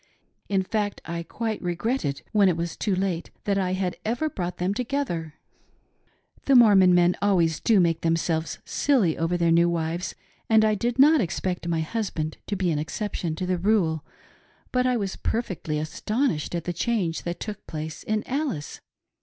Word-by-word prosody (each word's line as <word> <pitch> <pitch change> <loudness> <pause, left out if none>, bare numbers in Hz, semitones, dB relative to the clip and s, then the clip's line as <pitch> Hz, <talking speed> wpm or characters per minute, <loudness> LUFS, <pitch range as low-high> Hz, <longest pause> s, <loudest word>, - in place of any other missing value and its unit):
In 195 -2 +2
fact 205 +1 -2
I 170 0 -4
quite 220 +6 -4
regretted, 175 - -2
when 205 -3 +5
it 170 - 0
was 170 -1 -3
too 200 -3 0
late, 185 -3 -2
that 200 -1 +1
I 185 -1 0
had 185 -1 -2
ever 245 +8 -1
brought 180 -5 -4
them 180 +2 0
together. 225 - -2 0.5
" - - -36
The 275 - +4
Mormon 195 -7 +7
men 175 0 +4
always 175 -6 +2
do 220 -4 +4
make 165 -2 +2
themselves 165 -1 0
silly 235 - +2
over 165 +2 0
their 170 -1 +2
new 170 +1 +5
wives, 170 +1 -2 0.3
and 220 -1 +5
I 215 - +3
did 235 +4 -1
not 295 +2 +6
expect 180 -1 -2
my 165 -1 0
husband 160 -4 -3
to 205 - -1
be 185 -3 0
an 150 - 0
exception 170 0 -3
to 180 - -3
the 180 -1 0
rule; 175 -6 +1 0.7
but 250 0 +2
I 250 -1 +2
was 195 -3 -3
perfectly 185 -9 -2
astonished 175 - -1
at 170 - -2
the 175 - -3
change 180 -3 -1
that 175 0 -4
took 210 -2 -7
place 155 0 -5
in 215 0 -1
Alice. 265 - -3
185 Hz, 180 wpm, -25 LUFS, 165-215 Hz, 0.7 s, Mormon